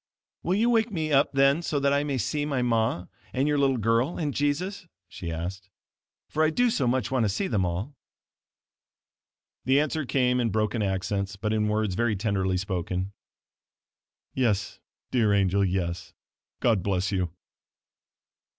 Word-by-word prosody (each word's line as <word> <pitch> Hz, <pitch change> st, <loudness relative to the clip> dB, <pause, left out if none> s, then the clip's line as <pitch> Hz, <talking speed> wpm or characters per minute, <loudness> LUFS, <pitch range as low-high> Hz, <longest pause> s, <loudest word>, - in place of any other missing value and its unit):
"Will 180 Hz, -, 0 dB
you 230 Hz, +4 st, +3 dB
wake 225 Hz, -1 st, +2 dB
me 160 Hz, -5 st, -2 dB
up 140 Hz, 0 st, +4 dB
then 140 Hz, +3 st, +3 dB
so 150 Hz, -4 st, -1 dB
that 140 Hz, 0 st, +2 dB
I 140 Hz, 0 st, +2 dB
may 140 Hz, -2 st, -1 dB
see 145 Hz, +4 st, -1 dB
my 140 Hz, -4 st, 0 dB
ma 110 Hz, -6 st, +1 dB, 0.3 s
and 135 Hz, +3 st, +1 dB
your 150 Hz, -1 st, +2 dB
little 135 Hz, -2 st, +3 dB
girl 115 Hz, +7 st, +1 dB
and 150 Hz, -4 st, -1 dB
Jesus?" 170 Hz, +6 st, -1 dB, 0.2 s
she 85 Hz, -2 st, -6 dB
asked, 95 Hz, +4 st, -5 dB, 0.6 s
"for 155 Hz, -, 0 dB
I 155 Hz, -, +4 dB
do 245 Hz, +9 st, +2 dB
so 135 Hz, -, +1 dB
much 130 Hz, +2 st, 0 dB
want 130 Hz, -3 st, +2 dB
to -, -, +1 dB
see 100 Hz, -, -1 dB
them 95 Hz, -, +1 dB
all." 95 Hz, +11 st, -4 dB, 1.7 s
The 135 Hz, +3 st, +4 dB
answer 155 Hz, +1 st, 0 dB
came 125 Hz, -1 st, +2 dB
in 120 Hz, -2 st, +1 dB
broken 110 Hz, +2 st, 0 dB
accents 100 Hz, 0 st, -1 dB
but 105 Hz, +2 st, -2 dB
in 105 Hz, -1 st, +1 dB
words 105 Hz, -2 st, 0 dB
very 115 Hz, +2 st, +1 dB
tenderly 95 Hz, -2 st, 0 dB
spoken 95 Hz, 0 st, -3 dB, 1.2 s
"Yes, 110 Hz, -7 st, 0 dB, 0.3 s
dear 110 Hz, -5 st, +3 dB
angel, 100 Hz, 0 st, +2 dB
yes. 90 Hz, -2 st, -2 dB, 0.5 s
God 110 Hz, -5 st, +3 dB
bless 95 Hz, 0 st, 0 dB
you." 90 Hz, -3 st, 0 dB
115 Hz, 160 wpm, -27 LUFS, 95-140 Hz, 1.7 s, up